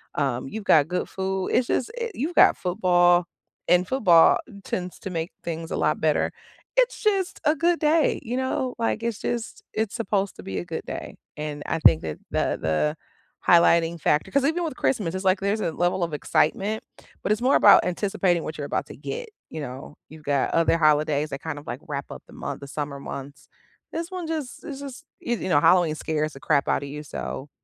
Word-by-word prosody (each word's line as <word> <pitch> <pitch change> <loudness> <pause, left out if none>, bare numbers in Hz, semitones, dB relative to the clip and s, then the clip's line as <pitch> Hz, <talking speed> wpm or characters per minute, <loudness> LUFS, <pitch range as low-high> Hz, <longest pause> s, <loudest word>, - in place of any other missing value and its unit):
um, 135 -3 -1
you've 220 +9 -6
got 155 -7 +5
good 180 +2 -2
food, 190 0 -2
it's 245 - +2
just 245 - 0
i 470 - -1
you've 325 +4 -3
got - - +7
football, 175 -2 +3 0.4
and 180 +1 +4
football 180 -11 +5 0.3
tends 180 -1 -4
to - - -6
make 165 0 -3
things 165 -1 -5
a - - -1
lot - - +1
better. - - +2 0.5
It's - - +2
just 390 -4 0
a 300 +2 +4
good 345 +1 +2
day, 310 0 +3
you 240 +2 -3
know, 260 -1 -1
like, 230 -1 -1
it's 230 -2 -2
just 235 -1 -4
it's 220 -1 -2
supposed 205 -4 -1
to - - -10
be 95 -1 -4
a 85 - -6
good - - -5
day, - - -7 0.2
and 150 -1 -5
I - - -1
think 80 - +6
that 80 -1 -5
the - - 0
the 80 - 0 0.5
highlighting 170 -1 +5
factor 150 0 +1
'cause 280 -1 +2
even 330 +4 +1
with 320 -6 -3
Christmas, 205 -10 0
it's 190 - -4
like 190 0 +3
there's 200 +2 0
a 170 - 0
level 175 +2 0
of 165 - -8
excitement, 195 +8 0 0.4
but - - 0
it's 215 - -4
more 255 +3 +4
about - - +7
anticipating 180 -2 0
what 155 - -6
you're 145 - -4
about - - -2
to - - -10
get, 485 0 -5 0.2
you 160 - -6
know, 135 +1 -8
you've 155 0 -13
got 140 -2 +1
other 165 0 +3
holidays 150 -1 +2
that 140 - -5
kind 155 -2 -5
of 145 - -16
like, 120 - -4
wrap 140 -2 -4
up - - -9
the - - -16
month, - - -6
the 140 - -8
summer 145 -1 -5
months. 140 +1 -8 0.5
This 335 +3 -4
one 365 -3 -5
just 310 -5 -4
it's 280 -4 -6
just, 275 -3 -9
you 240 0 -2
you - - -4
know, 145 - +5
Halloween 175 -3 +4
scares 155 -1 -2
the 135 - -11
crap 145 0 +1
out - - +1
of 140 - -6
you, 150 +1 -6
so, 145 -1 -6
175 Hz, 215 wpm, -25 LUFS, 150-235 Hz, 0.5 s, got